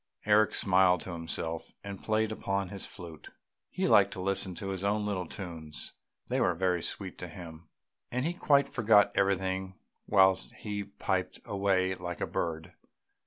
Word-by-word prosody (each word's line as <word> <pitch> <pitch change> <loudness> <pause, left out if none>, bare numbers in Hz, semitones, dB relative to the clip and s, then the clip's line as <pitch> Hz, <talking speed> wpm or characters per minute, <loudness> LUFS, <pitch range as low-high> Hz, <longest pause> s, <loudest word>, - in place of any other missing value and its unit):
Eric 105 +1 +4
smiled 90 -2 +4
to 95 - -6
himself, 80 -1 -4
and 100 -1 -7
played 110 0 +1
on 100 -1 0
his 100 0 -5
flute; 85 -3 -10 0.4
he - - -1
liked - - +6
to - - -7
listen 95 -1 +1
to 95 - -5
his 95 -1 -4
own 105 +1 +1
little 95 -4 -2
tunes; 80 -6 -8 0.3
they - - 0
were 90 - +2
very 90 -1 +1
sweet 95 +2 -4
to 90 - -5
him, 80 -1 -10 0.4
and 125 +3 -1
he 170 - 0
quite 140 -5 +3
forgot 110 -4 +4
everything 95 -1 0 0.3
whilst 95 -2 +4
he 105 -1 -4
piped 100 - -2
away 95 -2 +1
like 90 -2 -5
a - - 0
bird. 80 +1 -3
95 Hz, 165 wpm, -30 LUFS, 90-100 Hz, 0.4 s, liked